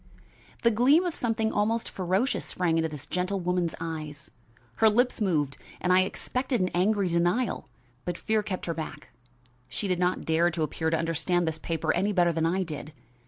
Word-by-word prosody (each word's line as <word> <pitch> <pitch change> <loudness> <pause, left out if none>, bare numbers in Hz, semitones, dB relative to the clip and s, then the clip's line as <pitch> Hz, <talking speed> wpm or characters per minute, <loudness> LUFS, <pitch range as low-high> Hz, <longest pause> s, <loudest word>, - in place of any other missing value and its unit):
The 235 - +5
gleam 265 +10 +5
of 350 - -1
something 225 -4 0
almost 225 +2 +1
ferocious 190 +7 0
sprang 175 -3 0
into 160 0 0
this 150 -3 -7
gentle 185 +2 -1
woman's 180 -2 0
eyes. 155 -3 -6 0.5
Her 220 - +6
lips 245 +2 +2
moved 150 -8 +1 0.2
and 180 0 +2
I 185 - +6
expected 250 +6 -1
an 185 -1 +1
angry 195 +2 +2
denial, 175 +8 0 0.3
but 175 -1 -3
fear 220 -1 +1
kept 195 -3 -4
her 170 - -1
back. 160 -1 -7 0.6
She 200 - -3
did 180 -2 0
not 180 0 0
dare 165 +2 +3
to 160 -1 -2
appear 160 +2 -1
to 165 - +1
understand 165 +2 0
this 160 0 -2
paper 165 -1 -1
any 200 +4 +1
better 175 -2 +3
than 165 0 +1
I 185 +3 +1
did. 155 -2 -7
180 Hz, 185 wpm, -28 LUFS, 165-210 Hz, 0.6 s, Her